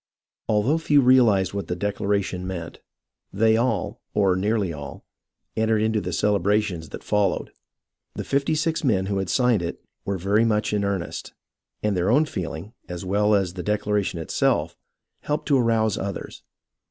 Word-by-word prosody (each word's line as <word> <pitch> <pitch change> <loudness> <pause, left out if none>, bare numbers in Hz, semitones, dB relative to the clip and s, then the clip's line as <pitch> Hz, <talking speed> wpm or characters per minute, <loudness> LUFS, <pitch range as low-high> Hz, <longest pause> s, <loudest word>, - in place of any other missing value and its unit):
Although 115 +9 +2
few 150 -3 +4
realized 120 -8 +4
what 100 -4 -4
the 90 - -2
declaration 100 -1 -1
meant, 85 -3 -6 0.5
they 110 +2 +3
all, 115 -1 -1
or 95 -3 +3
nearly 100 -2 0
all, 70 -1 -9 0.5
entered 110 -1 +2
into 110 -1 +1
the 90 - -4
celebrations 100 -3 +1
that - - -8
fol 105 -2 +2
lowed. - - -5 0.6
The - - -4
fifty 140 +3 0
six 160 +1 0
men 100 -9 +2
who 100 0 -1
had 95 - -3
signed 125 -6 +3
it 85 - -4 0.2
were 100 -1 -2
very 100 +5 +2
much 105 -2 +1
in 105 -1 +1
earnest, 100 -3 -3 0.5
and 105 -2 +1
their 90 +2 +1
own 145 +7 +4
feehng, 90 - -6 0.2
as 90 +1 -5
well 105 +2 +3
as 95 -3 0
the 90 - -5
declaration 105 -2 -1
itself, 80 - 0 0.4
helped 150 0 -3
to 140 -2 +4
arouse 115 -3 +2
others. 100 0 -5
105 Hz, 165 wpm, -24 LUFS, 95-110 Hz, 0.6 s, few